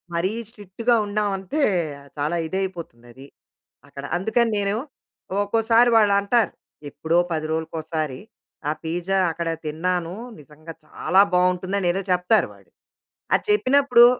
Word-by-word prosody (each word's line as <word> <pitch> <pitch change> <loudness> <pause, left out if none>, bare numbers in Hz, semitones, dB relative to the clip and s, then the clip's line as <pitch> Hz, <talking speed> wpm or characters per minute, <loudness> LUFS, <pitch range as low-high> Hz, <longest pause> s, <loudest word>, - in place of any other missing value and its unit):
మరీ 175 +3 0 0.2
స్ట్రిక్ట్‌గా 225 +2 -1
ఉన్నామంటే 205 +5 -2 0.6
చాలా 150 +4 -1
ఇదైపోతుంది 175 -10 -5
అది 135 +3 -13 0.6
అక్కడ. 140 0 -9
అందుకని 225 +5 +1
నేను 200 0 0 0.7
ఒక్కోసారి 225 +3 +3
వాళ్ళంటారు 205 +1 +3 0.4
ఎప్పుడో 160 +4 0 0.2
10 155 -1 -2
రోజులకోసారి. 160 -3 -3 0.5
ఆ - - +2
పిజ్జా 175 +4 -1
అక్కడ 170 +1 -4 0.2
తిన్నాను. 170 +2 -1 0.3
నిజంగా 155 +2 -12
చాలా 185 +4 +2
బాగుంటుందని 180 +1 +1
ఏదో 195 - -2
చెప్తారు 180 +5 +3
వాళ్ళు. - - -21 0.6
అది - - +3
చెప్పినప్పుడు 275 - +5
185 Hz, 110 wpm, -23 LUFS, 160-210 Hz, 0.7 s, చెప్పినప్పుడు